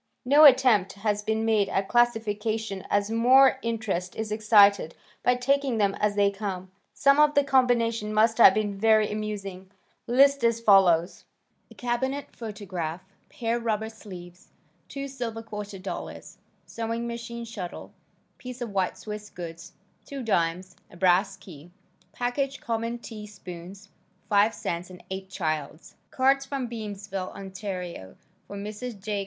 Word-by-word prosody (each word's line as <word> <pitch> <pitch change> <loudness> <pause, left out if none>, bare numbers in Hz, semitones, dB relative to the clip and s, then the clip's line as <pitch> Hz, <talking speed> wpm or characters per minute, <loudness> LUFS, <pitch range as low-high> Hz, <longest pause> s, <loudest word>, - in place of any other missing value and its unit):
No 290 +4 +7
attempt 235 -8 +5
has 210 +1 -1
been 220 +1 -1
made 215 -3 +2
at 195 0 -1
classification 220 -3 0
as 205 +1 +1
more 260 +4 +5
interest 215 -6 -3
is 220 -1 -4
excited 205 -5 +4 0.3
by 250 - +3
taking 270 0 +1
them 200 -2 +2
as 210 -1 +1
they 200 -1 +3
come. 190 -2 -5 0.2
Some 275 +1 +3
of 300 0 +5
the 285 - +5
combination 235 -5 +2
must 220 +2 +2
have - - +8
been 205 -2 -2
very 215 -1 +4
amusing. 200 -3 -5 0.4
List 275 +2 +4
is 230 0 +4
as - - -12
follows: 185 -5 +4 0.4
A - - -16
cabinet 260 +4 -3
photograph, 185 -6 -5 0.3
pair 235 0 -2
rubber 220 -1 -2
sleeves, 180 -5 -12 0.4
2 275 0 -5
silver 235 -4 -5
quarter 210 -2 -7
dollars, 190 +1 -7 0.3
sewing 230 +1 -4
machine 235 0 -6
shuttle, 200 -6 -8 0.5
piece 250 0 -8
of 240 -3 -5
white 190 -2 -1
swiss 210 -1 -7
goods, 170 -1 -9 0.3
2 275 -2 -6
dimes, 180 -3 -1
a 170 - -15
brass 185 +2 +3
key, 165 -2 -13 0.4
package 270 +3 -2
common 230 +1 -3
tea 220 -3 -9
spoons, 190 0 -11 0.4
5 205 +1 +4
cents 175 -4 -4
and 180 -1 -13
8 190 0 -5
childs' 155 -4 -4 0.2
cards 270 +1 +2
from 270 -2 -4
Beamsville, 205 -4 -6
Ont., 190 -1 -9 0.9
for 200 - -8
Mrs. 210 +2 -6
J. 205 +1 -3
215 Hz, 145 wpm, -26 LUFS, 195-235 Hz, 0.9 s, have